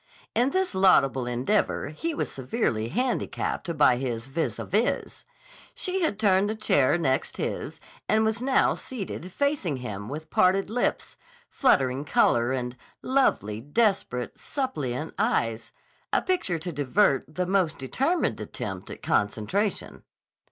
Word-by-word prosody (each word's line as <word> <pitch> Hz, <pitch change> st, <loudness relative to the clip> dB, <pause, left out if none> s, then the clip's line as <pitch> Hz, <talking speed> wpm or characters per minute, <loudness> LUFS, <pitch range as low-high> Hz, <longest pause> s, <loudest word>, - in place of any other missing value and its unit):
In 245 Hz, +3 st, +3 dB
this 375 Hz, -, 0 dB
laudable 135 Hz, -10 st, +4 dB
endeavor 130 Hz, -, 0 dB
he 315 Hz, -, -3 dB
was -, -, -2 dB
severely 125 Hz, -, -1 dB
handicapped 205 Hz, -, -2 dB
by 130 Hz, -4 st, +5 dB
his 120 Hz, -3 st, -3 dB
vis 160 Hz, +5 st, -2 dB
à -, -, -6 dB
vis. 220 Hz, +4 st, -1 dB, 0.5 s
She 375 Hz, -5 st, -2 dB
had 315 Hz, -, +1 dB
turned 200 Hz, -1 st, +3 dB
the 215 Hz, -, -1 dB
chair 195 Hz, -8 st, +3 dB
next 135 Hz, -6 st, 0 dB
his -, -, -4 dB, 0.3 s
and 220 Hz, 0 st, +3 dB
was 220 Hz, +1 st, 0 dB
now 265 Hz, +1 st, +3 dB
seated 195 Hz, -6 st, -6 dB
facing 280 Hz, -, 0 dB
him 105 Hz, -4 st, -6 dB
with 155 Hz, +3 st, -7 dB
parted 190 Hz, +3 st, +3 dB
lips, 245 Hz, +2 st, -1 dB, 0.3 s
fluttering 135 Hz, -, +2 dB
color, 120 Hz, -4 st, +3 dB
and 125 Hz, -1 st, -3 dB, 0.3 s
lovely, 110 Hz, -, +1 dB
desperate, 145 Hz, -, 0 dB
suppliant 155 Hz, -, -3 dB
eyes, 115 Hz, -, 0 dB, 0.4 s
a -, -, +2 dB
picture 355 Hz, -, 0 dB
to 175 Hz, +3 st, -5 dB
divert 145 Hz, +1 st, +1 dB
the 180 Hz, -, 0 dB
most 185 Hz, -4 st, +1 dB
determined 255 Hz, -, 0 dB
attempt 95 Hz, -2 st, -6 dB
at -, -, -9 dB
concentration. 110 Hz, -, -1 dB
170 Hz, 135 wpm, -26 LUFS, -, 0.5 s, by